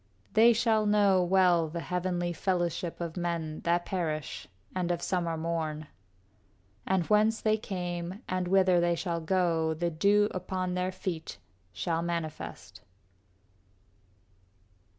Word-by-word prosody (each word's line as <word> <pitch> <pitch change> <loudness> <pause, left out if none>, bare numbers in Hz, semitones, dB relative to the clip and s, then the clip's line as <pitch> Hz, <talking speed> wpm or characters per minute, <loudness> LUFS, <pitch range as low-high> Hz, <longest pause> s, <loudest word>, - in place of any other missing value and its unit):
They 225 +2 +7
shall 225 -2 +2
know 200 -3 +4
well 175 -3 +3
the 170 +2 -4
heavenly 175 +1 -2
fellowship 175 -1 -1
Of 170 -2 -4
men 170 -3 -2
that 175 +1 +2
perish 155 -6 -3 0.3
and 180 -2 -1
of 175 -1 0
summer 170 -2 -1
morn. 160 -2 -2 1.0
And 190 -3 +1
whence 215 +3 +3
they 215 0 +2
came 180 -1 -5
and 185 -1 -1
whither 185 -1 +4
they 170 0 +2
shall 170 -1 -2
go 165 -2 +1
The 170 +2 -1
dew 205 +6 +3
upon 185 0 -3
their 180 +1 -1
feet 175 - -5 0.3
shall 165 - -1
manifest. 170 -2 -5
175 Hz, 125 wpm, -29 LUFS, 170-190 Hz, 1.0 s, They